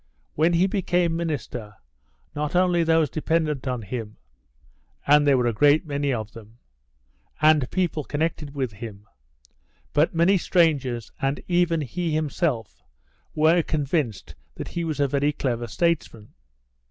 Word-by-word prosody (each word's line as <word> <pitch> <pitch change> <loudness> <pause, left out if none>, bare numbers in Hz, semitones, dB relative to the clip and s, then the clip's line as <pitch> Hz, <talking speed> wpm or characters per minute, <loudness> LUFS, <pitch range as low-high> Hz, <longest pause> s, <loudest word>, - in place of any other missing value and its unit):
When 160 +3 +2
he 170 +2 +4
became 180 -3 0
minister, 135 -10 -4 0.6
not 150 +2 -2
only 180 -1 +3
those 160 -1 +3
dependent 155 -1 -1
on 125 -3 -2
him 110 0 -6 0.9
(and 145 0 +5
there 140 -2 +5
were 120 -2 +1
great 145 - +4
many 145 -1 -1
of 110 -3 -3
them) 115 0 -14 0.8
and 155 -4 +4
people 175 -5 -1
connected 150 -1 -3
with 130 -4 -2
him, 105 -1 -9 0.9
but 155 +3 +2
many 175 +4 +4
strangers 140 - +1
and 135 0 0
even 175 -2 +2
he 165 +3 -2
himself 150 - -2 0.5
were 160 +3 +4
convinced 150 - -2 0.2
that - - -6
he 170 - -3
was 155 -3 -3
a 140 - +3
very 140 +2 +1
clever 120 -5 -2
statesman. 150 -7 -2
150 Hz, 135 wpm, -24 LUFS, 125-165 Hz, 0.9 s, and